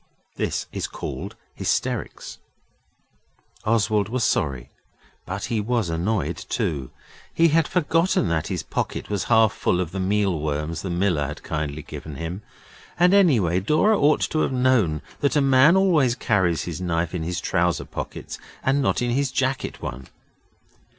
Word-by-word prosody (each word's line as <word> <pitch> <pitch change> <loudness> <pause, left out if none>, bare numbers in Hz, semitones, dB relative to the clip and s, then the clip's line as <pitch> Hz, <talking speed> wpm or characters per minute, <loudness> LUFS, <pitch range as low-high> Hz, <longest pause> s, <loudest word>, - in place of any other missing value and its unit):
This - - -2
is - - -3
called - - -6 0.2
hysterics. - - -3 1.3
Oswald 110 -2 +2
was 125 +1 -1
sorry, 65 -5 0 0.6
but 100 +3 -4
he 115 -3 -1
was 110 -5 0
annoyed 90 +5 -1
too. 70 -4 -3 0.4
He 165 0 +4
had 160 0 +3
forgotten 165 - +1
that 80 -2 0
his - - -3
pocket - - -4
was 100 -2 -1
half 110 -3 +4
full 90 - 0
of 90 -3 -2
the 95 - -4
meal 95 -2 +1
worms 75 +2 -2
the 95 - -4
miller 85 -5 +1
had - - -8
kindly 75 0 -3
given 75 +2 -8
him. 85 +7 -5 0.6
And, 180 +2 +5
anyway, 120 - +4
Dora 155 - +3
ought 150 -3 +3
to 155 - 0
have - - +1
known 125 - +2 0.2
that 140 - +1
a - - +5
man 135 +6 +5
always 155 -11 +3
carries 95 -9 +1
his 85 0 -5
knife 85 -1 -1
in 90 - -2
his 85 +2 -2
trousers 85 -4 0
pocket - - -6 0.2
and 135 +2 +2
not 130 - +1
in 120 - 0
his 135 +1 0
jacket 130 0 -2
one. 65 +1 -6
100 Hz, 155 wpm, -23 LUFS, 85-130 Hz, 1.3 s, And